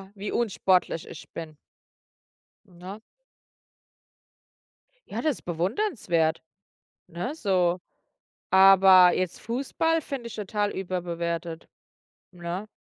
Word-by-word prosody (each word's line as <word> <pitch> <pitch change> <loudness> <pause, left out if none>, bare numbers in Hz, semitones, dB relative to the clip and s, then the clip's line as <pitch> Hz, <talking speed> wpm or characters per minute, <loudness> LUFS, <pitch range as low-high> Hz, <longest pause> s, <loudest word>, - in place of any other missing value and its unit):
wie 200 +1 -5
unsportlich 185 -7 0
ich - - -11
bin. 160 -2 -8 1.1
Ne? 185 +2 -10 2.1
Ja - - -4
das 310 -5 -1
bewundernswert, 175 - -1 0.6
ne, 180 - -5
so. 185 - +1 0.7
Aber 190 -1 +7
jetzt 185 -2 -3
Fußball 280 +7 -1
finde 270 -4 -6
ich - - -10
total 205 0 -2
überbewertet, 170 -3 -4 0.6
ne? 180 +3 -6
185 Hz, 85 wpm, -26 LUFS, 175-215 Hz, 2.1 s, Aber